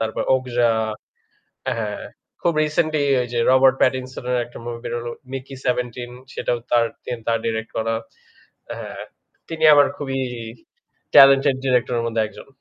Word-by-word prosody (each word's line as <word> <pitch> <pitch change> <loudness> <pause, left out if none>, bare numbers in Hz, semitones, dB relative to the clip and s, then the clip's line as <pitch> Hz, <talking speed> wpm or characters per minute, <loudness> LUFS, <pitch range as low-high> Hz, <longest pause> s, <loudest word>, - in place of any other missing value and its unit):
তারপর 110 -1 -1
'Okja' 120 -2 +2 0.9
অ্যা - - 0
হ্যাঁ, 105 -2 -4 0.4
খুব 170 - +2
recently 155 -1 +1
ঐযে, 130 -2 +3
যে 120 - 0
'Robert 130 0 +6
Pattinson' 130 0 0
এর 125 - +2
একটা 120 - -12
movie 120 -1 -5
বের - - -4
হলো 120 0 -5 0.2
'Mickey 135 +1 -6
17' 125 -1 -2 0.2
সেটাও 120 - -1
তার, 120 -1 +4 0.2
তিনি 120 - -5
তার 115 0 +2
direct 110 0 -2
করা। 115 0 0 0.8
হ্যাঁ, - - -7 0.5
তিনি 160 -1 -4
আমার 145 -1 +6
খুবই 135 -2 -3 1.0
talented 135 0 +7
director 125 -1 +2
এর - - -2
মধ্যে 115 -1 0
একজন। - - -13
125 Hz, 150 wpm, -22 LUFS, 115-135 Hz, 1.0 s, talented